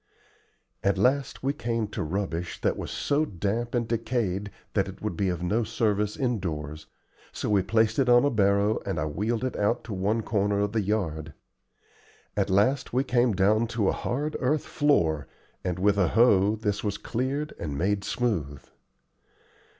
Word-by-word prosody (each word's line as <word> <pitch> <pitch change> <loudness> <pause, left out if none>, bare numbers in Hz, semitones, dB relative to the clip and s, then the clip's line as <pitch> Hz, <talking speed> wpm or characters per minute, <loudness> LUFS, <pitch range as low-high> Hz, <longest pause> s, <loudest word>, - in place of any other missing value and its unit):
At 100 -1 +2
last 130 +8 +1
we 135 +1 +1
came 115 -4 -2
to - - -4
rubbish 85 0 -3
that - - +1
was - - -5
so 145 +2 0
damp 110 - -2
and 120 -2 0
decayed 110 -4 -1 0.2
that - - +1
it - - -9
would - - -3
be 95 +2 0
of 90 -1 -3
no 110 +6 +1
service 105 -1 0
indoors, 80 - -3 0.4
so - - -3
we 100 -2 +4
placed 110 +4 +2
it 130 -2 +3
on 120 +2 +6
a 145 - +2
barrow 100 -1 +2
and - - -2
I 75 - 0
wheeled 105 +10 -1
it 130 - -2
out 105 +4 0
to 115 - -6
one 105 +4 0
corner 100 -2 +1
of 105 0 0
the 110 0 +1
yard. 80 -7 -2 1.0
At - - 0
last 105 +9 +2
we 130 +2 +2
came 120 -3 +2
down 105 +4 +3
to 100 -4 +3
a - - +3
hard 145 +5 -2
earth 140 +3 +1
floor, 85 - +1 0.4
and 90 -2 -2
with 100 +2 +2
a 90 - +4
hoe 105 -1 +4
this 105 -2 -2
was 100 -1 -1
cleared 135 +5 -2
and 75 -4 -4
made 100 +4 0
smooth. 85 - -2
105 Hz, 175 wpm, -27 LUFS, 95-120 Hz, 1.0 s, on